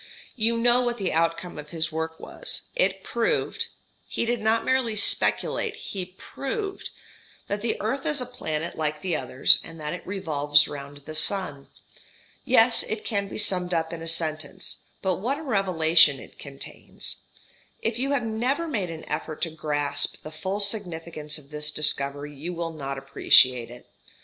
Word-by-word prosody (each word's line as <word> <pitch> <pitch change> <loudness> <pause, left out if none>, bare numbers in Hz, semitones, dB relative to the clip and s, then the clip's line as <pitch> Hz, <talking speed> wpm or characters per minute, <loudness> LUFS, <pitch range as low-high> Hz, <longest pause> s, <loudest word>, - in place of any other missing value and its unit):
You 230 0 +3
know 240 +1 +5
what 240 -1 0
the 195 -4 -2
outcome 165 +1 -1
of 150 0 -9
his 160 0 -2
work 160 0 -4
was. - - -4
It - - +1
proved - - -1 0.4
he - - -2
did 240 -1 -1
not 220 +1 +2
merely 255 -4 +1
speculate, 205 - +4
he 190 -3 -6
proved 390 +8 -5 0.6
that 205 +1 -3
the 230 0 -2
earth 265 +6 -2
is 300 -2 +2
a 250 - 0
planet 170 -10 -4
like 150 -1 -2
the 180 -3 0
others, 130 -3 +6
and 165 0 -11
that 150 0 -4
it 180 - -6
revolves 150 -6 +3
round 140 0 -8
the 155 - -7
sun. 155 -3 -1 0.8
Yes, 245 -3 +5
it 220 -1 -4
can 200 -2 -1
be - - -7
summed 180 -4 +1
up 160 0 -1
in 165 - -6
a 165 - -6
sentence, 160 +2 -1 0.3
but 185 -2 +1
what 250 +8 -1
a 315 - -8
revelation 170 - +4
it - - -14
contains. 140 -1 -6 0.7
If 225 +1 -1
you 270 +2 -1
have 280 -3 +1
never 245 +9 -1
made 210 - -2
an 160 -1 -8
effort 155 - -4
to 165 - -1
grasp 145 -2 -1
the 155 - -8
full 190 +6 -3
significance 170 -7 -3
of 145 -1 -13
this 150 0 -1
discovery 145 -1 +2
you 170 +6 -6
will 165 -1 -4
not 140 -3 -5
appreciate 130 -3 +4
it. 120 0 -12
170 Hz, 170 wpm, -25 LUFS, 150-220 Hz, 0.8 s, others